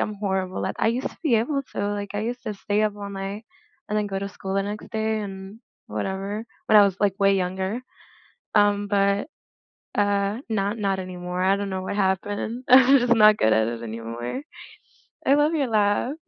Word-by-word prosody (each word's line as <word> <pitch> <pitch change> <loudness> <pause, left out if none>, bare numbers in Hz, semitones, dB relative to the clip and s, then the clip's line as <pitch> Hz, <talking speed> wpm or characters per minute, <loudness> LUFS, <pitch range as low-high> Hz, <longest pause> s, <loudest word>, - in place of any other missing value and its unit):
I'm 215 - -1
horrible, 190 -2 -2
like, - - -3
I - - +2
used 245 +3 -1
to - - -18
be 280 -8 +3
able 275 +5 0
to, 205 0 -1
like, 200 -1 -5
I 205 - -1
used 240 +3 -4
to 215 -2 -3
stay 205 +1 -1
up 210 -1 0
all 200 -1 -6
night 195 +3 -5 0.4
and 210 0 0
then 210 - -1
go 195 -1 -2
to 200 0 -4
school 195 -1 -6
the 195 - +2
next 205 +1 -6
day 220 -1 -1
and 195 +2 -8 0.3
whatever, 195 +3 -3 0.2
when 215 - +5
I - - +9
was, 195 -2 0
like, 200 -2 +3
way 195 0 +5
younger, 190 +5 -2 0.7
um, 205 -1 +3
but 200 +2 +2 0.7
uh, 205 +1 +1
not 205 +1 -1
not 195 -2 0
anymore, 180 0 -4
I 195 +1 +4
don't 200 -1 -3
know 190 0 -2
what 200 - -4
happened. 205 +5 -1
I'm 265 +2 +8
just 240 -1 +3
not 215 -1 +7
good 110 - +3
at 110 +1 +2
it 115 0 -4
anymore. 115 - -5 0.8
I 275 - +5
love 295 +2 +3
your 280 -4 +1
laugh. 215 +4 +1
205 Hz, 205 wpm, -24 LUFS, 190-220 Hz, 0.8 s, I